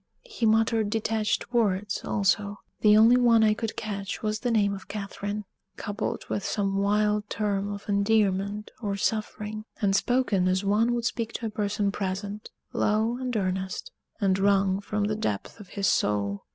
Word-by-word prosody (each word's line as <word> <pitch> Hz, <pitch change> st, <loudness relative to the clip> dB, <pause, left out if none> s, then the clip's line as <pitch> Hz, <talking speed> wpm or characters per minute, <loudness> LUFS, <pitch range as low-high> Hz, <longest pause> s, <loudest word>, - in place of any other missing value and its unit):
He 430 Hz, -, -1 dB
muttered 220 Hz, -1 st, +3 dB
detached 220 Hz, +2 st, -1 dB
words 205 Hz, -3 st, +1 dB
also; 200 Hz, +1 st, 0 dB, 0.2 s
the 210 Hz, 0 st, +6 dB
only 230 Hz, +3 st, +7 dB
one 235 Hz, -2 st, +5 dB
I 215 Hz, -1 st, +5 dB
could 225 Hz, 0 st, -4 dB
catch 200 Hz, -2 st, -4 dB
was 215 Hz, 0 st, -1 dB
the 245 Hz, -, -1 dB
name 205 Hz, -3 st, +2 dB
of 195 Hz, -1 st, -8 dB
Catherine, 205 Hz, 0 st, -5 dB, 0.3 s
coupled 205 Hz, +1 st, -3 dB
with 200 Hz, -, -2 dB
some 195 Hz, -1 st, -1 dB
wild 210 Hz, +1 st, +1 dB
term 205 Hz, -1 st, -1 dB
of 200 Hz, 0 st, -7 dB
endearment 200 Hz, 0 st, +1 dB
or 200 Hz, -3 st, -1 dB
suffering, 215 Hz, +1 st, -2 dB, 0.2 s
and 195 Hz, -3 st, +2 dB
spoken 225 Hz, -5 st, +2 dB
as 185 Hz, +1 st, +1 dB
one 225 Hz, +4 st, +2 dB
would 235 Hz, -1 st, -2 dB
speak 230 Hz, -1 st, -2 dB
to 230 Hz, -, -4 dB
a -, -, -1 dB
person 205 Hz, -1 st, 0 dB
present 200 Hz, +2 st, -4 dB, 0.2 s
low 220 Hz, +3 st, +1 dB
and 250 Hz, -2 st, -2 dB
earnest, 190 Hz, -, -2 dB, 0.3 s
and 195 Hz, -3 st, +2 dB
wrung 195 Hz, -1 st, +3 dB
from 210 Hz, 0 st, -2 dB
the 210 Hz, +1 st, 0 dB
depth 105 Hz, -, -3 dB
of 205 Hz, -, -11 dB
his 200 Hz, +1 st, -3 dB
soul. 100 Hz, -, +1 dB
210 Hz, 165 wpm, -27 LUFS, 200-220 Hz, 0.3 s, only